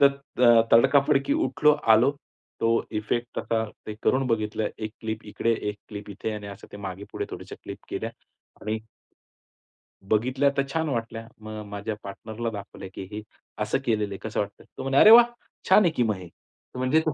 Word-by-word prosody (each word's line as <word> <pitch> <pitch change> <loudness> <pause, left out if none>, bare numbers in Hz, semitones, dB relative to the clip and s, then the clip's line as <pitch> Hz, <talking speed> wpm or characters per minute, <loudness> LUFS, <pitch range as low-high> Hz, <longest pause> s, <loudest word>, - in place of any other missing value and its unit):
तर 140 - +8 0.4
अ, 120 -1 +8
तडकाफडकी 135 - +5
उठलो, 150 0 +4 0.2
आलो. 120 +5 +5 0.5
तो 115 - +3 0.3
इफेक्ट 120 +3 -2
आता 110 -1 0 0.2
ते 110 - -5
करून 130 0 +2
बघितलं, 110 -2 0
एक 110 -1 -4
क्लिप 110 0 -4
इकडे 115 +2 0 0.2
एक 105 - -3
क्लिप 105 -1 -8
इथे 100 +2 -4
आणि 105 -1 -7
असं 100 -1 -10
ते - - -7
मागे-पुढे 100 0 -6
थोड्याश्या - - -8
क्लिप - - -7
केल्या - - -3 0.5
आणि 110 +1 -2 1.3
बघितल्या 130 +6 +3
तर 140 - +3
छान 160 -1 0
वाटल्या. 115 -3 -3
मग 110 0 -7
माझ्या 105 +1 -4
पार्टनरला 110 +3 -5
दाखवलं, 100 -2 -8
की - - -6
"हे 105 +1 -5 0.4
असं 105 - +1
केलेलं 105 -3 0
आहे 95 - -5
कसं 110 - -2
वाटतंय?" 100 0 -4
तो - - -5
म्हणला 135 +1 +3
"अरे 215 - +9
वाह! 235 +1 +10 0.4
छान 190 - +8
आहे 175 - +3
की 120 - +3
मग 110 -2 +1
हे." 90 -2 -10 0.5
म्हणजे 130 +5 +3
तो 155 - +2
110 Hz, 180 wpm, -26 LUFS, 105-130 Hz, 1.3 s, वाह